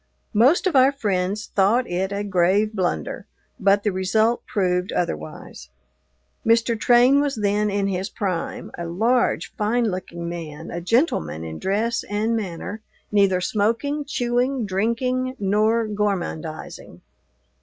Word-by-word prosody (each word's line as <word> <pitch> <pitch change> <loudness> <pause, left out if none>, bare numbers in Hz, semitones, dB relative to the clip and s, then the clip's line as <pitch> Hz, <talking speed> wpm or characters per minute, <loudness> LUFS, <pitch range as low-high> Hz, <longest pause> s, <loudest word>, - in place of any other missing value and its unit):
Most 250 - +4
of 365 -5 +1
our 265 +1 +6
friends 205 -5 -1
thought 210 +6 +3
it 185 +2 -2
a 200 +1 -2
grave 200 +3 +2
blunder, 175 - -2 0.3
but 200 +1 +3
the 210 - +1
result 215 +5 +1
proved 180 -4 0
otherwise. 75 - -4 0.7
Mr. 230 +1 +3
Train 245 +5 +5
was 285 -1 -1
then 210 0 +1
in 200 0 0
his 190 0 -2
prime 185 -5 -3
a 170 - -4
large, 230 +9 +1
fine 225 +1 +1
looking 170 -2 -5
man, 165 -2 -7
a 170 - -4
gentleman 170 - 0
in 80 -1 -6
dress 220 +4 0
and 215 +3 0
manner, 205 +1 -5 0.3
neither 200 -3 +3
smoking, 230 +10 0
chewing, 245 -2 0
drinking, 250 +6 -1
nor 215 +2 +2
gormandizing. 195 -7 -4
205 Hz, 130 wpm, -23 LUFS, 185-235 Hz, 0.7 s, our